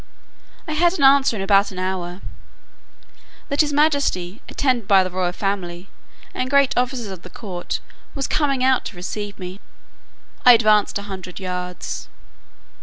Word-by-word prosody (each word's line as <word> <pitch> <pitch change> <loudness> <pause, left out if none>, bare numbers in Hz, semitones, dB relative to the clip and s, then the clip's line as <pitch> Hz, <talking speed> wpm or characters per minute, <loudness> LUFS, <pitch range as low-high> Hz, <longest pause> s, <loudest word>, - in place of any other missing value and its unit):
I - - -3
had 345 +4 +2
an 285 - 0
answer 270 -3 +5
in 195 - -3
about 200 0 +4
an 190 - -10
hour, 185 0 -3 1.3
"that 280 +2 +3
his 300 -1 0
majesty, 280 - +1
attended 250 -7 0
by 195 -2 +6
the 185 - -4
royal 180 -1 -1
family, 180 -2 -3 0.4
and 255 - -2
great 280 -1 +3
officers 245 -3 -1
of 185 -3 -8
the 180 - -11
court, 180 -3 -5 0.4
was 275 -2 -1
coming 275 -4 0
out 260 -1 +3
to - - -6
receive 205 +3 -5
me." 185 +1 -8 0.8
I 250 - +9
advanced 215 -3 +3
a 200 - -6
hundred 190 -3 -8
yards. 180 -1 -5
205 Hz, 155 wpm, -21 LUFS, 185-265 Hz, 1.3 s, I